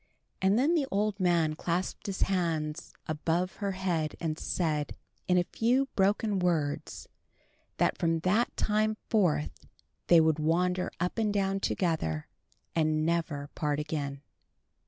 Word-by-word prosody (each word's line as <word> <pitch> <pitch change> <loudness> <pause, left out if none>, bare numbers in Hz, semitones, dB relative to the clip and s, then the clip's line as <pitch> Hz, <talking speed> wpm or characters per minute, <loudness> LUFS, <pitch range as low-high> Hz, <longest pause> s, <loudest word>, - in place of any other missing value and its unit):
And 190 +3 +4
then 285 +7 +3
the 300 -5 +1
old 205 +1 0
man 170 -4 +2
clasped 175 +5 -2
his 195 -2 0
hands 165 -5 -1
above 165 +4 -1
her 200 -2 -2
head 175 -5 -1
and 160 -2 -2
said, 155 -4 -1 0.3
in 180 - +4
a 175 - +4
few 250 +8 +1
broken 200 +1 +2
words, 160 -5 -1 0.7
that - - +1
from 165 -1 +1
that 205 +7 +1
time 215 0 +1
forth 180 -10 +1 0.4
they 170 - +7
would 160 -1 +3
wander 180 +4 +1
up 180 +6 -1
and 215 -2 +2
down 195 -1 0
together, 160 - -1 0.5
and 155 -1 +2
never 160 -4 -1
part 150 -1 -1
again. 145 -2 -4
175 Hz, 135 wpm, -30 LUFS, 155-195 Hz, 0.7 s, they